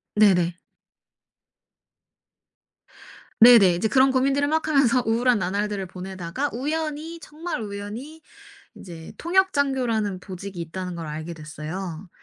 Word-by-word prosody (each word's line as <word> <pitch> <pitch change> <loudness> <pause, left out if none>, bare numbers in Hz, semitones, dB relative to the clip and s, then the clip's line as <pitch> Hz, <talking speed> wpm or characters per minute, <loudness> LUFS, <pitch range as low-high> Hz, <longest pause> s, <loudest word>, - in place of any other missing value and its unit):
네네. 180 -5 +4 2.9
네네. 225 -7 +8
이제 210 +6 0
그런 265 +3 +4
고민들을 275 +2 +1
막 315 0 0
하면서 270 -5 +3
우울한 235 +1 +2
나날들을 200 +2 -2
보내다가 185 +7 -5
우연히 310 +5 -4
정말 315 -2 -5
우연히 215 +10 -7 0.6
이제 165 -3 -10
통역 380 +3 +2
장교라는 240 -9 0
보직이 185 -1 -8
있다는 180 +2 -5
걸 165 -2 -6
알게 155 +3 -6
됐어요. 160 +3 -7
210 Hz, 270 characters per minute, -24 LUFS, 180-275 Hz, 2.9 s, 네네